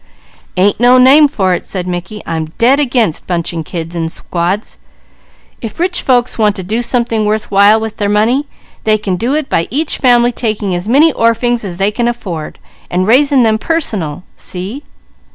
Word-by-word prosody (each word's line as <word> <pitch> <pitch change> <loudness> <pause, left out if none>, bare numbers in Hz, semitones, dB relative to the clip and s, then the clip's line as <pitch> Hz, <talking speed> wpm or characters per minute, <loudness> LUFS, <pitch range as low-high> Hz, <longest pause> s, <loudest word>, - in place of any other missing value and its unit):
"Ain't 195 +3 +2
no 245 +2 +5
name 275 +4 +6
for 190 -9 0
it," - - -2
said 185 -2 -4
Mickey. 180 +4 -5
"I'm 160 -1 -3
dead 255 +5 +3
against 240 - 0
bunching 170 -2 -2
children 165 +1 -4
in - - -3
squads. 175 +5 -3 0.8
If 225 +3 -7
rich 360 +1 -1
folks 245 -2 +1
want 210 -2 +2
to 190 - -6
do 220 +6 -2
something 235 -2 0
worth 210 +1 -1
while 200 +2 +5
with 220 -1 -5
their 205 -1 -1
money, 230 +8 +1 0.4
they 215 -1 +3
can 200 -3 -2
do 240 +9 -1
it 305 -2 -2
by 165 - 0
each 295 +5 -2
family 245 -2 +4
taking 215 -5 -2
as 175 +4 -3
many 295 +5 +4
orphings 230 +1 +1
as 180 -4 -6
they 195 +2 +1
can 240 +2 -1
afford, 185 -10 -5 0.3
and 180 +1 0
raising 265 +4 +4
them 220 -1 +2
personal. 205 - -2
See?" 195 +10 -6
215 Hz, 180 wpm, -13 LUFS, 185-245 Hz, 0.8 s, name